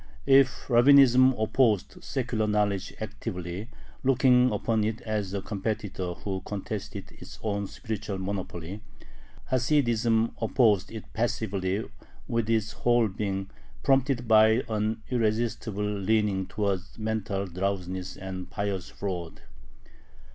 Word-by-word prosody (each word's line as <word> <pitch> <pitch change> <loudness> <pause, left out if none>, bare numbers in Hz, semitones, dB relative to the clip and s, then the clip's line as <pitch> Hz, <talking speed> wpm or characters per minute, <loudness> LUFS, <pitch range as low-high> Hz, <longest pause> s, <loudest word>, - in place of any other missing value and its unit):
If 135 -1 +4
Rabbinism 130 0 +7
opposed 110 -1 +1
secular 120 -4 -1
knowledge 100 -2 0
actively, 90 +5 -5 0.3
looking 125 -1 +5
upon 110 +1 0
it 110 +1 -1
as 105 -3 -2
a 100 -1 -3
competitor 100 -3 -3
who 95 0 -4
contested 100 -2 -5
its - - -11
own 100 -2 -1
spiritual 105 -3 -5
monopoly, 95 -1 -5 0.7
Hasidism 120 -4 +2
opposed 110 -4 +3
it 110 -1 -7
passively, 100 -3 -1 0.4
with 115 -2 -1
its 110 -2 +1
whole 120 0 +2
being, 95 -1 -3 0.3
prompted 135 -2 +2
by 110 +2 +5
an 110 0 -1
irresistible 110 -2 0
leaning 105 -1 0
towards 100 -3 -2
mental 110 -2 -2
drowsiness 95 0 -3
and 95 -1 -6
"pious 100 -2 -3
fraud." 90 -4 -5
105 Hz, 110 wpm, -27 LUFS, 95-115 Hz, 0.7 s, Rabbinism